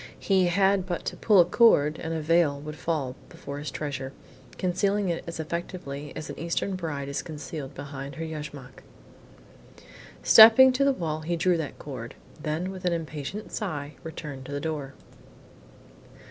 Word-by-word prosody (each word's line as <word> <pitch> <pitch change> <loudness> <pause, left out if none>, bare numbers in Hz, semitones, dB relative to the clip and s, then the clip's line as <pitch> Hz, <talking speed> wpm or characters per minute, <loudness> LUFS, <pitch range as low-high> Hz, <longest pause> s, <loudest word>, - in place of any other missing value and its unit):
He 190 -2 +3
had 190 +1 +2
but 175 -2 -3
to - - -3
pull 210 -4 +4
a 175 - +8
cord 160 -7 +4
and 165 - -4
a 160 -1 -2
veil 155 -2 +3
would 150 +1 -7
fall 145 -6 -2
before 140 0 -7
his 145 -1 -4
treasure, 135 -2 -5 0.4
concealing 195 +2 +1
it 170 - -2
as 170 - -6
effectually 155 -3 -5
as 155 - -6
an - - -8
Eastern 170 +4 -1
bride 150 -6 -4
is 140 0 -2
concealed 150 -3 -7
behind 140 -1 -7
her 165 - -4
yashmak. 150 -4 -8 1.4
Stepping 230 +4 +9
to 255 +2 +1
the 275 - +4
wall, 160 - -2
he 170 +2 -1
drew 180 +2 +2
that 160 -3 -5
cord, 125 -5 -8 0.3
then 160 +5 -2
with 185 -1 -9
an 180 -1 +1
impatient 160 +5 -5
sigh, 150 -8 -4
returned 150 -4 -7
to - - -8
the 145 - -2
door. 145 -3 -4
160 Hz, 165 wpm, -27 LUFS, 145-180 Hz, 1.4 s, Stepping